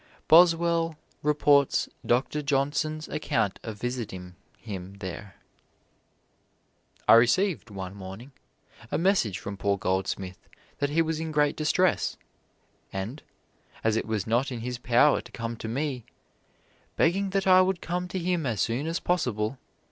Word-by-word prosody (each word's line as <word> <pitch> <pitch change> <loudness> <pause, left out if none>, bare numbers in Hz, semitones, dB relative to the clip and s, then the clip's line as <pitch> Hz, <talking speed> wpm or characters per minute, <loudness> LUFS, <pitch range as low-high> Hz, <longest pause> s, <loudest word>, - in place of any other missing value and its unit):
Boswell 165 -1 +5 0.2
reports 145 -2 +3 0.2
Doctor 130 +5 +1
Johnson's 145 +2 -1
account 115 -9 -1
of 110 -2 -7
visiting 105 -7 -5 0.2
him 100 -3 -8
there: 95 0 -7 1.7
"I - - +8
received, 120 - +3
one 95 -2 -6
morning, 100 +7 -9 0.6
a 145 - 0
message 165 - +2
from 100 +1 -6
poor 100 0 0
Goldsmith 95 0 -2 0.4
that 145 - +1
he 165 +3 +2
was 160 -1 -2
in 160 0 -3
great 150 -1 +2
distress, 180 +4 +1 0.7
and, 100 +10 -5 0.6
as 110 -1 +2
it 110 - -1
was 110 -3 -1
not 120 +5 +1
in 120 -2 -5
his 125 0 -4
power 125 +4 +4
to - - -15
come 115 0 -4
to 110 - -6
me, 130 +1 -2 0.9
begging 195 +4 +2
that 195 0 0
I 185 -1 +7
would 185 -1 +1
come 180 +1 -3
to 185 - -4
him 175 -4 0
as 110 -4 -2
soon 125 +7 0
as 165 +1 -1
possible. 125 - -1
135 Hz, 140 wpm, -27 LUFS, 110-160 Hz, 1.7 s, I